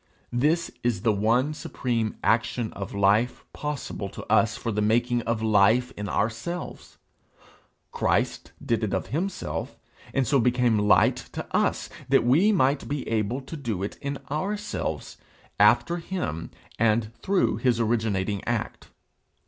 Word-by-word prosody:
This 155 +7 +1
is 120 -6 -1
the 115 - +4
one 115 +8 +2
supreme 115 -7 -2
action 115 0 +1
of 100 0 -6
life 100 +5 +2
possible 145 -9 -4
to - - -9
us 115 +1 +3
for 115 - -3
the 105 0 -1
making 120 +3 +2
of 115 -1 0
life 110 +4 +4
in 105 0 -5
ourselves. 115 - -3 0.9
Christ - - 0
did 115 -1 0
it 105 - 0
of - - -3
himself, 185 +5 -3 0.3
and 135 -1 +1
so 140 +3 +3
became 120 -2 +3
light 105 0 +4 0.2
to - - -4
us, - - +1 0.2
that - - +5
we 155 - +4
might 140 -7 +2
be 145 -1 -3
able 115 +4 -1
to 135 +5 -8
do 115 - -3
it 100 - -5
in 140 0 -3
ourselves, 205 +7 -3 0.4
after 170 - +4
him, 165 - -4 0.3
and 110 0 +2
through 195 -1 +1
his 125 -3 +1
originating 105 -4 0
act. - - -3
120 Hz, 140 wpm, -26 LUFS, 110-140 Hz, 0.9 s, that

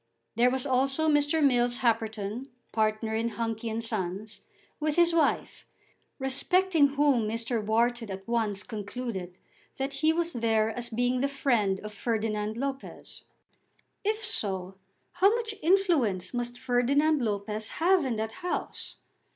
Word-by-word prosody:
There 240 +2 +4
was 260 +1 -1
also 270 +3 +1
Mr. 295 0 +3
Mills 245 -1 +2
Happerton, 225 0 -1 0.2
partner 220 0 0
in 225 +1 0
Hunky 225 0 -3
and 225 +1 -2
Sons, 210 -1 -3 0.4
with 305 -1 0
his 345 -1 +4
wife, 320 -4 0 0.5
respecting 305 +4 +3
whom 275 -6 +3
Mr. 230 0 -2
Wharton 230 +1 +1
at 195 +1 -7
once 220 -4 0
concluded 205 -4 -5 0.4
that 270 +1 -2
he 310 +4 +2
was 340 +1 -1
there 225 -2 +1
as 240 +1 -3
being 245 +2 0
the 275 - +2
friend 230 -9 +1
of 210 0 -8
Ferdinand 215 -1 -2
Lopez. 275 +1 -6 0.8
If 430 +1 0
so, 190 - 0 0.4
how 390 +5 +4
much 455 -2 -3
influence 320 - +2
must 240 0 -3
Ferdinand 270 +5 +2
Lopez 210 -1 -2
have 360 +1 +4
in 255 -4 -1
that 220 0 -3
house! 360 - -3
240 Hz, 135 wpm, -28 LUFS, 220-285 Hz, 0.8 s, There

